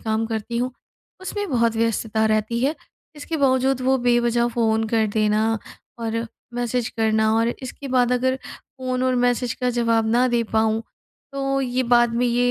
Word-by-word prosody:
काम 220 0 -1
करती 225 +1 -3
हूँ, 250 +1 -1 0.5
उसमें 410 +1 -4
बहुत 230 -3 +1
व्यस्तता 225 -1 0
रहती 215 +2 0
है। 280 +5 +1 0.4
इसके 315 +2 -4
बावजूद 265 -1 +2
वो 265 +1 +3
बेवजह 240 -1 +2
फ़ोन 225 -2 +1
कर 220 -1 +2
देना 215 +1 +2 0.4
और 230 0 -2 0.3
मैसेज 245 0 -1
करना 220 -1 +1
और 230 +1 +2
इसके 275 +2 -7
बाद 250 -1 +3
अगर 260 +1 +1
फ़ोन 255 -1 -5
और 255 0 +2
मैसेज 245 -1 0
का 250 - +2
जवाब 230 -1 +2
ना 245 +2 +3
दे 235 - +3
पाऊँ, 220 0 +2 0.5
तो 275 0 -1
ये 255 -1 0
बाद 240 -1 +3
में 245 +1 +1
ये 245 +1 +2
240 Hz, 170 wpm, -22 LUFS, 225-255 Hz, 0.5 s, वो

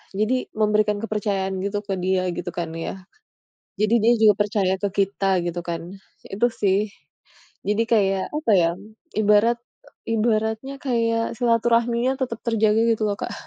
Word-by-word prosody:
jadi 230 +5 0
memberikan 210 -1 +2
kepercayaan 195 -3 -2
gitu 205 +1 -1
ke 195 - -1
dia" 185 0 0
gitu - - -4
kan 170 -2 -3
ya. 165 - -4 0.9
Jadi 215 +1 +2
dia 235 +2 +5
juga 215 -1 +7
percaya 200 -2 0
ke 200 - 0
kita 195 -2 +1
gitu 175 0 -3
kan. 170 -1 -3 0.4
Itu 210 +5 +1
sih. 200 +1 +1 0.8
Jadi 210 +2 +2
kayak 195 -4 +2
apa 300 -7 0
ya, 170 -2 +4 0.5
ibarat 215 +2 +4 0.5
ibaratnya 220 +3 0
kayak 230 -3 0
silaturahminya 235 +2 +2
tetap 235 -4 -2
terjaga 220 -1 +2
gitu 220 - -3
loh 200 - -2
Kak. - - -4
215 Hz, 145 wpm, -23 LUFS, 195-230 Hz, 0.9 s, juga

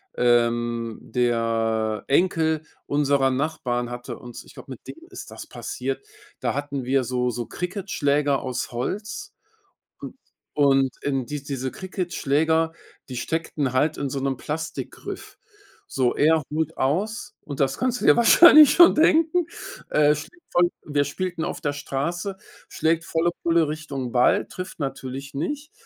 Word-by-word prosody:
ähm 120 -1 +1
der 115 -2 0
Enkel 160 0 +2 0.2
unserer 140 -2 +2
Nachbarn 130 -4 -2
hatte 120 0 -6
uns 120 -1 -10
ich - - -17
glaube, - - -12
mit - - -10
dem 330 0 -11
ist 375 - -9
das - - -9
passiert. 415 - -5 0.3
Da - - -1
hatten 140 -1 -3
wir 130 +1 +2
so 125 0 -1
so 120 0 -3
Cricketschläger 150 -7 0
aus 130 -2 -4
Holz. 210 - -4 0.7
Und - - -9 0.4
und, 135 -2 +4
ähm, 135 -3 -1
die 150 -1 -5
diese 135 -2 -4
Cricketschläger, 160 -3 0 0.4
die 125 - -6
steckten 150 -1 -2
halt 150 +4 +1
in 140 - -2
so 135 - -3
'nem 135 -1 -1
Plastikgriff. 160 +4 -6 0.6
So, 125 -2 +1
er 160 +1 +3
holt 155 0 -1
aus, 200 - -1
und 140 -2 -7
das 135 -1 +1
kannst 250 -1 0
du - - -4
dir - - +8
wahrscheinlich 305 +5 +8
schon 345 0 +8
denken. 325 +2 +3 0.4
Er 150 0 +4
schlägt 325 - -10
voll 175 0 +4
und 145 - -10
wir 145 - +4
spielten 175 +3 -3
auf 175 - -4
der 145 -3 -1
Straße, 170 +7 -3 0.3
schlägt 165 +1 0
volle 165 +1 +1
Pulle 170 -1 +3
Richtung 140 -5 -5
Ball, 125 0 +3
trifft 185 0 -8
natürlich 135 -1 -5
nicht. 290 - -4
145 Hz, 150 wpm, -24 LUFS, 130-170 Hz, 0.7 s, dir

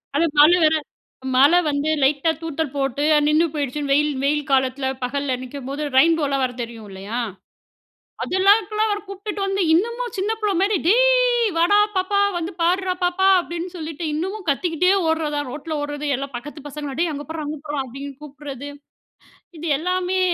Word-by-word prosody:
அது 320 +4 +3
மழ 300 +3 +8
வர, 310 0 +4 0.6
மழ 280 +4 +7 0.2
வந்து 290 +1 -1
லைட்டா 285 +4 +2
தூத்தல் 320 -3 -3
போட்டு 275 0 -1 0.2
நின்னு 305 +2 +4
போயிடுச்சுன்னு, 285 -1 -2
வெயில் 300 +1 +3
வெயில் 295 +1 0
காலத்ல 265 0 +1 0.2
பகல்ல 270 +1 -1
நிக்கம்போது 275 +2 -6
ரெயின்போ 325 +1 +4
லாம் 275 -1 +1
வரும் 250 -1 -5
தெரியும் 230 -2 -9
இல்லயா? 200 +5 -5 1.0
அதெல்லாம் 385 +3 +4
இதுக்லாம் 430 +1 -1
அவர 410 0 -1
கூப்ட்டுட்டு 400 +1 -5
வந்து, 390 0 -1
இன்னமும் 470 +7 0
சின்ன 395 +3 0
புள்ள 420 -2 0
மாரி, 400 +1 +2
"டேய் - - +4
வாடா 345 +5 +4 0.2
பாப்பா 375 +2 +1 0.2
வந்து 340 +1 -3
பார்றா 365 +2 +1
பாப்பா". 360 +2 +2
அப்டின்னு 345 0 -5
சொல்லிட்டு 320 0 -5
இன்னமும் 375 +5 -4
கத்திக்கிட்டே 340 +5 +1 0.2
ஓட்றதான். 300 -3 -1
ரோட்ல 305 +2 -5
ஓட்றது 290 0 -4
எல்லா 275 +2 -5
பக்கத்து 295 +4 -8
பசங்களும் 290 -1 -6
டேய் 340 -2 +1
அங்க 290 0 -6
பார்றா 320 -1 -4
அங்க 300 0 -5
பார்றா 290 -2 -2
அப்டின்னு 275 +3 -8
கூப்ட்றது, 285 -1 -8 0.9
இது 330 - -6
எல்லாமே 365 +2 -1
310 Hz, 160 wpm, -22 LUFS, 280-370 Hz, 1.0 s, மழ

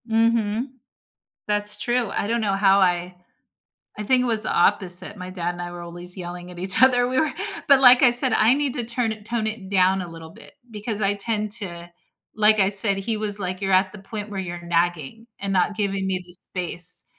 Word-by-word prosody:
Mhm. 225 0 +1 0.8
That's 210 0 0
true, 240 -3 -1
I - - -3
don't 235 +1 -1
know 205 -2 -1
how 195 0 +3
I 180 -1 0 0.8
I - - -3
think 255 +3 +3
it - - -1
was 225 -3 +1
the - - -3
opposite. 185 +1 0
My 185 -1 -8
dad 175 -2 -4
and 175 0 -8
I 175 0 -6
were 175 0 -9
always 175 +2 -10
yelling 175 0 -8
at 175 - -12
each 190 +4 +3
other. 245 -1 +4
We 260 +1 -1
were 315 -3 +1 0.4
But 280 -1 +6
like 250 -1 +7
I 255 - +7
said, 245 +2 +6
I 225 +4 +4
need 280 -2 -2
to 245 - +1
turn 235 -1 -1
it 215 -1 -11
tone 230 0 -2
it 215 -3 -6
down 190 0 +2
a 175 - -8
little 165 -1 -11
bit, - - -15 0.2
because 215 0 -4
I 200 0 +1
tend 210 0 -2
to 175 -5 -6 0.4
like 215 0 +3
I 190 - +3
said, 200 0 +6
he 220 +3 -3
was 210 -1 -1
like, 185 0 -5
"You're 195 -1 -2
at 185 +1 +2
the 210 - -11
point 205 +2 -8
where 200 - -6
you're 175 -2 -7
nagging 175 +4 -2
and 195 0 -3
not 195 +2 0
giving 195 -2 -2
me 185 -1 -2
the 175 - -14
space." 180 -1 -3
200 Hz, 225 wpm, -22 LUFS, 180-225 Hz, 0.8 s, like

